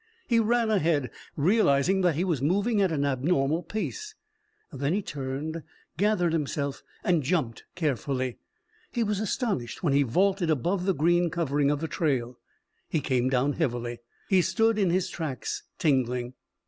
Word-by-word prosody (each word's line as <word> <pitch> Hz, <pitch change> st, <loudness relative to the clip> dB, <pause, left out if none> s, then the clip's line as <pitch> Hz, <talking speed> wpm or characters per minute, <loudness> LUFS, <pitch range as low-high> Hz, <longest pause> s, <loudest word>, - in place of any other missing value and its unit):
He 230 Hz, -2 st, +3 dB
ran 230 Hz, 0 st, +2 dB
ahead, 155 Hz, -, +1 dB, 0.2 s
realizing 180 Hz, 0 st, +3 dB
that 175 Hz, -4 st, +2 dB
he 170 Hz, -, 0 dB
was 165 Hz, -8 st, 0 dB
moving 200 Hz, -, +2 dB
at 190 Hz, -3 st, +2 dB
an 145 Hz, -3 st, 0 dB
abnormal 140 Hz, +3 st, +1 dB
pace. 420 Hz, -, -5 dB, 0.6 s
Then 140 Hz, +3 st, -1 dB
he 205 Hz, -, -1 dB
turned, 145 Hz, +3 st, -4 dB, 0.3 s
gathered 180 Hz, -2 st, +2 dB
himself, 145 Hz, -3 st, -2 dB, 0.2 s
and 180 Hz, -6 st, +2 dB
jumped 135 Hz, -, -1 dB
carefully. 135 Hz, -5 st, -1 dB, 0.5 s
He 235 Hz, -, 0 dB
was 210 Hz, -2 st, -1 dB
astonished 205 Hz, -, -2 dB
when 150 Hz, -6 st, +2 dB
he 140 Hz, -, +4 dB
vaulted 185 Hz, -, +2 dB
above 175 Hz, +6 st, 0 dB
the 190 Hz, -, +2 dB
green 175 Hz, +3 st, +3 dB
covering 145 Hz, -4 st, +1 dB
of 145 Hz, 0 st, 0 dB
the 160 Hz, -, -1 dB
trail. 130 Hz, -7 st, -1 dB, 0.5 s
He 160 Hz, -, +1 dB
came 130 Hz, -3 st, +1 dB
down 135 Hz, +2 st, +1 dB
heavily. 120 Hz, -6 st, -2 dB, 0.3 s
He 190 Hz, -2 st, +4 dB
stood 225 Hz, +3 st, +2 dB
in 195 Hz, -3 st, +3 dB
his 180 Hz, +1 st, +1 dB
tracks, 155 Hz, -6 st, -4 dB, 0.2 s
tingling. 125 Hz, -4 st, +1 dB
160 Hz, 155 wpm, -27 LUFS, 135-190 Hz, 0.6 s, he